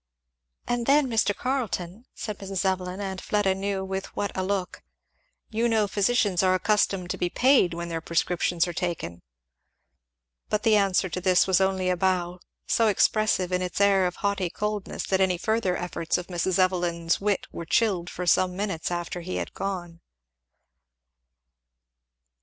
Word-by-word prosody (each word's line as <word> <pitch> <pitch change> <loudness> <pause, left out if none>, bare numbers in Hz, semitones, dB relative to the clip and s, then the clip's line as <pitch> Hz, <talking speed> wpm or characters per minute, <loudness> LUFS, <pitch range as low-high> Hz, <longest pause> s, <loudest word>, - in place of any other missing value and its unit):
"And 240 -1 -1
then, 285 +1 +5
Mr. 220 -4 +1
Carleton," 235 -5 -3
said 210 -3 -5
Mrs. 195 -1 -3
Evelyn, 185 0 -1
and 190 -2 -4
Fleda 205 -2 +1
knew 195 0 -2
with 190 0 -4
what 205 - -3
a 190 - -1
look, 185 -1 -2 0.7
"you 230 +2 +1
know 220 -2 +2
physicians 205 -2 +2
are 185 -1 +3
accustomed 195 -2 +1
to - - -4
be 175 - 0
paid 250 -7 +3
when 170 0 -5
their 165 -1 -3
prescriptions 170 +1 0
are 175 - -4
taken." 165 - -4 1.3
But 210 0 0
the 220 -2 +4
answer 195 -2 +2
to 180 - -4
this 185 -1 +4
was 190 0 +3
only 190 -1 +1
a 180 - 0
bow, 180 -1 0 0.3
so 230 - +2
expressive 210 -2 +2
in 180 0 0
its 180 +1 -3
air 195 -2 +4
of 180 - -5
haughty 200 -3 -1
coldness 210 +2 -3
that 190 0 +1
any 185 -2 +2
further 220 -1 0
efforts 175 -2 -2
of 180 - -5
Mrs. 180 +1 0
Evelyn's 175 -2 +1
wit 200 -1 0
were 170 - -6
chilled 185 -6 +1
for 180 - -5
some 180 +1 +3
minutes 195 -6 -2
after 175 0 -4
he 185 +2 -5
had - - -4
gone. 175 -4 -5
190 Hz, 165 wpm, -26 LUFS, 180-205 Hz, 1.3 s, then